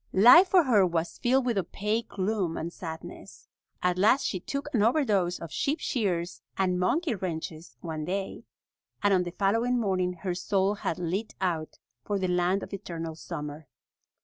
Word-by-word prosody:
Life 245 Hz, -, +8 dB
for 365 Hz, -2 st, +5 dB
her 225 Hz, -8 st, +4 dB
was 170 Hz, -2 st, -1 dB
filled 260 Hz, +1 st, +2 dB
with 235 Hz, -5 st, +1 dB
opaque 210 Hz, +5 st, -2 dB
gloom 190 Hz, -4 st, -1 dB
and 170 Hz, +2 st, -4 dB
sadness. 160 Hz, -2 st, -9 dB, 0.4 s
At 180 Hz, 0 st, +1 dB
last 225 Hz, +8 st, +4 dB
she 185 Hz, -, -1 dB
took 280 Hz, +10 st, -4 dB
an 225 Hz, -, +2 dB
overdose 210 Hz, -, +2 dB
of 165 Hz, -2 st, -8 dB
sheep 295 Hz, +2 st, -1 dB
shears 175 Hz, -, -2 dB, 0.2 s
and 180 Hz, -2 st, +1 dB
monkey 290 Hz, -, +1 dB
wrenches 160 Hz, -, -5 dB
one 155 Hz, -2 st, -4 dB
day, 195 Hz, +2 st, -4 dB, 0.6 s
and 205 Hz, -1 st, +4 dB
on 185 Hz, -, +4 dB
the 175 Hz, -1 st, -4 dB
following 230 Hz, +5 st, +2 dB
morning 185 Hz, -4 st, 0 dB
her 185 Hz, -2 st, -1 dB
soul 190 Hz, +2 st, +1 dB
had 200 Hz, -5 st, -3 dB
lit 185 Hz, +5 st, -3 dB
out 170 Hz, -4 st, -2 dB, 0.3 s
for 205 Hz, -, -1 dB
the 190 Hz, -1 st, -1 dB
land 180 Hz, +2 st, +1 dB
of -, -, -9 dB
eternal 165 Hz, -5 st, -5 dB
summer. 150 Hz, -1 st, -7 dB
190 Hz, 170 wpm, -28 LUFS, 175-220 Hz, 0.6 s, Life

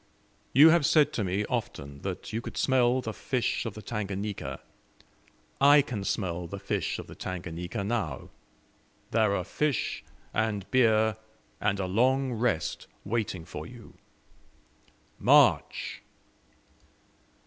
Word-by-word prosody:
You 150 Hz, +5 st, +8 dB
have 165 Hz, -1 st, +4 dB
said 150 Hz, +1 st, +4 dB
to 110 Hz, -, -1 dB
me 95 Hz, +3 st, -1 dB
often 70 Hz, -5 st, -4 dB
that 95 Hz, +2 st, -5 dB
you 115 Hz, -, -1 dB
could -, -, -8 dB
smell 130 Hz, -1 st, +3 dB
the 110 Hz, -3 st, -5 dB
fish 125 Hz, -1 st, -1 dB
of 110 Hz, -, -6 dB
the 110 Hz, -, -9 dB
Tanganika 100 Hz, -, -4 dB, 1.0 s
I 145 Hz, +1 st, +7 dB
can 120 Hz, -7 st, -5 dB
smell 90 Hz, -4 st, -2 dB
the 100 Hz, -, -6 dB
fish -, -, -2 dB
of -, -, -7 dB
the -, -, -11 dB
Tanganika 90 Hz, +1 st, -5 dB
now. 110 Hz, +2 st, -3 dB, 0.8 s
There 110 Hz, -3 st, +3 dB
are 90 Hz, -, -1 dB
fish, 145 Hz, -, -1 dB, 0.3 s
and 105 Hz, -3 st, -1 dB
beer, 110 Hz, -4 st, +3 dB, 0.4 s
and 100 Hz, -1 st, 0 dB
a 95 Hz, -, -1 dB
long 130 Hz, +7 st, +2 dB
rest 110 Hz, -8 st, -1 dB, 0.2 s
waiting 100 Hz, -5 st, -2 dB
for -, -, -7 dB
you. -, -, -13 dB, 1.3 s
MARCH!" -, -, +3 dB
110 Hz, 125 wpm, -28 LUFS, 95-125 Hz, 1.3 s, You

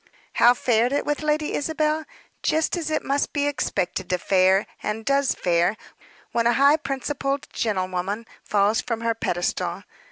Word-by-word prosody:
How 245 Hz, +1 st, +5 dB
fared 240 Hz, 0 st, +2 dB
it 285 Hz, -, 0 dB
with 295 Hz, +1 st, -1 dB
Lady 305 Hz, 0 st, 0 dB
Isabel? 310 Hz, +1 st, 0 dB, 0.4 s
Just 315 Hz, +3 st, +1 dB
as 330 Hz, -3 st, -3 dB
it 310 Hz, -, -1 dB
must 280 Hz, +1 st, -1 dB
be 285 Hz, -1 st, 0 dB
expected 200 Hz, -9 st, -2 dB
to 180 Hz, -, +1 dB
fare, 190 Hz, +2 st, +3 dB, 0.2 s
and 220 Hz, +1 st, -3 dB
does 275 Hz, 0 st, +2 dB
fare, 175 Hz, +4 st, +1 dB, 0.5 s
when 235 Hz, 0 st, +2 dB
a 240 Hz, -, +4 dB
high 280 Hz, +4 st, +5 dB
principled 275 Hz, -1 st, -3 dB
gentlewoman 190 Hz, 0 st, -2 dB, 0.2 s
falls 210 Hz, +3 st, +2 dB
from 230 Hz, -2 st, -3 dB
her 230 Hz, 0 st, +1 dB
pedestal. 175 Hz, -5 st, -2 dB
240 Hz, 155 wpm, -24 LUFS, 200-290 Hz, 0.5 s, How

